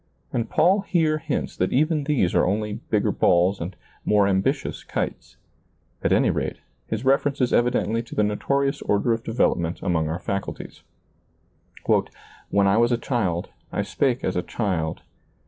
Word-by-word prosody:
And 115 -2 -1
Paul 180 +6 +4
here 160 -5 +1
hints 155 -3 -3
that - - 0
even 150 +1 +2
these 135 - +1
are - - +4
only 105 +2 -1
bigger - - +2
balls 90 +2 +2
and 90 +2 -5 0.3
more 105 -1 +3
ambitious 100 +9 0
kites. - - -4 0.7
At - - +1
any - - +4
rate, - - -2 0.3
his 110 +3 -3
reference 140 +1 +2
is 125 -2 +1
evidently 120 -2 +2
to 120 - -10
the 105 - +3
notorious 135 +7 0
order 105 +3 +1
of 115 0 -3
development 85 -7 0
among 80 -3 0
our 80 - -2
faculties, 100 +2 -5 0.7
" - - -4
When 100 0 +3
I 100 +2 +4
was 120 +1 +3
a 120 - +3
child, 100 -10 -1 0.2
I - - -1
spake 130 -2 0
as 95 - -1
a 90 - +1
child 90 -7 -2
115 Hz, 165 wpm, -24 LUFS, 95-135 Hz, 0.7 s, Paul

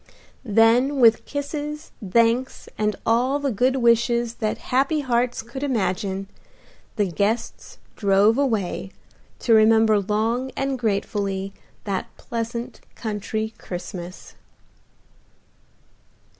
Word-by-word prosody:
Then 240 +5 +3
with 230 -2 +5
kisses, 295 +1 -5
thanks 230 +6 +1
and 210 0 0
all 245 +5 +2
the 285 -2 -1
good 250 +5 +2
wishes 235 -1 +2
that 215 -1 0 0.2
happy 275 +4 +2
hearts 245 -3 0
could 235 +4 -8
imagine, 195 -7 -1 0.7
the 210 - +2
guests 200 +6 -2 0.2
drove 200 +2 +4
away, 215 -8 -1 0.5
to 230 - +3
remember 220 -1 +5
long 220 +6 -1
and 270 -1 -1
gratefully 200 -3 -2 0.3
that 195 -2 -2
pleasant 235 +1 -5
country 220 0 -3
Christmas. 180 0 -8
225 Hz, 100 wpm, -23 LUFS, 205-255 Hz, 0.7 s, with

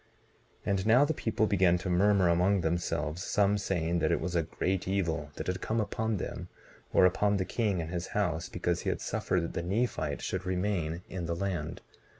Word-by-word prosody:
19:19 - - -8
And 100 -1 +1
now 125 +6 +6
the 160 - 0
people 110 -5 0
began 95 -4 +3
to 90 - -6
murmur 95 +1 +4
among 90 +3 +3
themselves; 80 -1 -1
some 100 0 +2
saying 85 -3 0
that - - +1
it - - +2
was 90 -1 -3
a 85 - +4
great 90 +3 -2
evil 85 -6 -1
that - - -5
had 90 +1 -2
come 115 +1 -1
upon 110 0 -1
them, - - -5 0.4
or - - +5
upon 100 +3 +3
the 95 - -1
king 105 -5 0
and 80 0 -4
his 90 0 -3
house, 90 -4 0
because 90 -1 -1
he - - -1
had - - -1
suffered 90 - -1
that 85 - -4
the - - -2
Nephite 90 -6 -1
should 95 0 -2
remain 90 -3 -1
in 90 -2 -5
the 85 - -1
land. 85 -3 -3
90 Hz, 205 wpm, -30 LUFS, 85-100 Hz, 0.4 s, now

